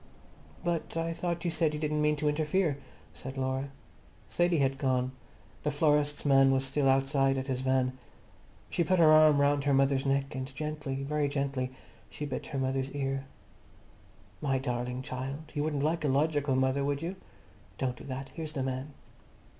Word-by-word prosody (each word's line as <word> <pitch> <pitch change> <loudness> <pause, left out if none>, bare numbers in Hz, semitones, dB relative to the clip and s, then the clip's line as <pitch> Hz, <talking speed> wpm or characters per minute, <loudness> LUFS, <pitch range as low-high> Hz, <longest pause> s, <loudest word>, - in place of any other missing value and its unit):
"But 170 -2 -2
I 165 0 -1
thought 170 0 -3
you 170 - +1
said 160 -1 +1
you - - -4
didn't 150 0 0
mean 150 0 +3
to 150 +1 -1
interfere," 150 +1 +1 0.3
said 135 +1 -7
Laura. 130 +1 -1 0.6
Sadie 175 -1 +2
had 135 -1 +1
gone. 130 -2 +1 0.5
The 150 - 0
florist's 150 0 +2
man 135 -1 +6
was 135 0 +2
still 135 +1 +1
outside 135 0 +3
at 130 - -2
his 130 -2 -2
van. 130 -1 +1 0.8
She 170 - +2
put 185 +2 +2
her 160 -2 +7
arm 155 -2 +7
round 140 0 +2
her 140 -1 +3
mother's 135 0 +2
neck 135 0 0
and 130 -1 -4
gently, 150 -3 -3
very 150 +1 0
gently, 140 -2 -1 0.4
she 150 - -5
bit 140 -3 -4
her 140 - -4
mother's 135 0 0
ear. 135 -1 -2 1.2
"My 135 -3 +1
darling 125 -1 -3
child, 135 +3 -5
you 145 -1 -1
wouldn't 150 -2 -1
like 160 +2 0
a - - +2
logical 145 0 +2
mother, 130 +1 +2
would 145 +2 -1
you? 175 +3 -3 0.6
Don't 130 -2 -1
do - - -12
that. 135 0 -5
Here's 155 -2 -6
the 135 -4 -2
man." 135 +2 -4
140 Hz, 180 wpm, -30 LUFS, 135-150 Hz, 1.2 s, her